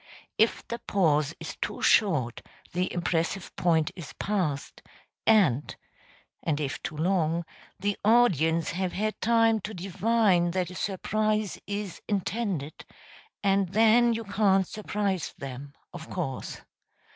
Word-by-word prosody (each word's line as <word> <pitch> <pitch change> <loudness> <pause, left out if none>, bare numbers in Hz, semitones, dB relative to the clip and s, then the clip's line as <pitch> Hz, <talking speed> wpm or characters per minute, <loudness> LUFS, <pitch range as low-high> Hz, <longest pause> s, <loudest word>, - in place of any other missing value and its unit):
If 220 +1 +2
the 235 - -4
pause 155 -8 +1
is - - -6
too - - -3
short 150 - +3 0.3
the 180 +1 0
impressive 175 +2 -2
point 160 -3 +2
is 170 -5 -9
passed, 180 -9 -2 0.5
and 170 - +3 0.7
[and 155 -3 -1
if 145 -1 -3
too 155 - -5
long] 170 -1 +1 0.3
the 205 +1 0
audience 170 - +3
have 185 +1 -2
had 215 +2 -2
time 225 -1 +4
to 215 +2 -6
divine 195 0 +2
that 180 -1 -1
a - - -9
surprise 215 +2 -1
is 205 -2 -4
intended 195 -6 -2 0.6
and 195 -2 +2
then 225 +2 +5
you 225 - -3
can't 195 -2 +2
surprise 205 -4 -2
them, 135 +1 -8 0.2
of 170 -2 -9
course. 145 -8 -4
190 Hz, 125 wpm, -27 LUFS, 165-215 Hz, 0.7 s, then